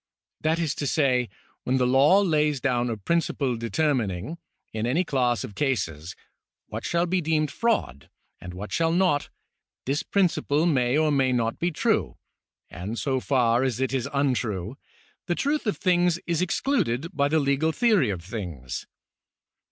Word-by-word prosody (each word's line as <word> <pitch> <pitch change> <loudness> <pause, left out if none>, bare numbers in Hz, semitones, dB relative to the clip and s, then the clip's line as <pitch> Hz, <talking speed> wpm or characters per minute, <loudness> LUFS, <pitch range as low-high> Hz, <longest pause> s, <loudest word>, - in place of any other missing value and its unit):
That 160 +1 +1
is 165 -4 -1
to 145 - -1
say, 130 -5 +2 0.3
when 130 +1 +1
the 125 - +2
law 140 +10 +5
lays 150 -6 +1
down 125 -2 0
a 115 - -3
prin 170 - +1
ciple 135 -7 -2
determining, 120 - -1 0.3
in 110 +1 -2
any 155 +9 +2
class 125 -7 0
of 105 - -7
cases, 95 - -2 0.5
what - - -6
shall 170 0 +1
be 180 +1 0
deemed 155 -1 0
fraud, 215 - -1 0.3
and 90 0 -9
what 100 +1 -7
shall 165 +6 +1
not, 175 -4 +2 0.6
this 140 +3 0
principle 170 -5 +1
may 130 -5 +2
or 155 -1 +2
may 135 -2 +2
not 115 -2 -1
be 175 - +1
true, 155 - 0 0.5
and 105 +7 -6
so 130 0 0
far 125 -3 +2
as 130 -3 -1
it 130 0 -1
is 130 -3 -1
untrue, 125 -7 -1 0.5
the 175 - 0
truth 290 - -1
of 210 - 0
things 175 -2 +2
is 170 -1 0
excluded 175 - -1
by 140 -1 +2
the 155 +2 +1
legal 140 +3 +1
theory 210 - +3
of 90 -4 -4
things. 85 - -6
140 Hz, 165 wpm, -25 LUFS, 120-165 Hz, 0.6 s, law